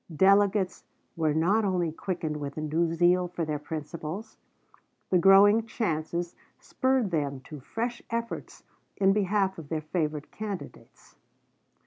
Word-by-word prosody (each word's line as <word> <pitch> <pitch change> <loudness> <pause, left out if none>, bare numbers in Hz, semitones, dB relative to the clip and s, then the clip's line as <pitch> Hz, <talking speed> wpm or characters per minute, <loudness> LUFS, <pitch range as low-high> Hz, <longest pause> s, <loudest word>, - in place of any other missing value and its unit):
Delegates 195 +2 +3 0.3
were 155 -2 +1
not 190 +8 +3
only 180 -4 0
quickened 165 -2 -3
with 145 -1 -6
a - - -2
new 160 +2 0
zeal 175 +2 +3
for 175 -1 -3
their 150 -1 -2
principles; 160 +7 -6 0.7
the 180 - +5
growing 205 +5 +6
chances 170 -5 -2 0.2
spurred 260 -6 0
them 145 -4 -1
to 150 +2 -10
fresh 235 - -4
efforts 230 0 -5 0.3
in 195 0 +4
behalf 195 -2 +1
of 150 -3 -10
their 160 -1 -2
favorite 155 -2 -3
candidates. 210 -3 -8
175 Hz, 130 wpm, -28 LUFS, 155-200 Hz, 0.7 s, growing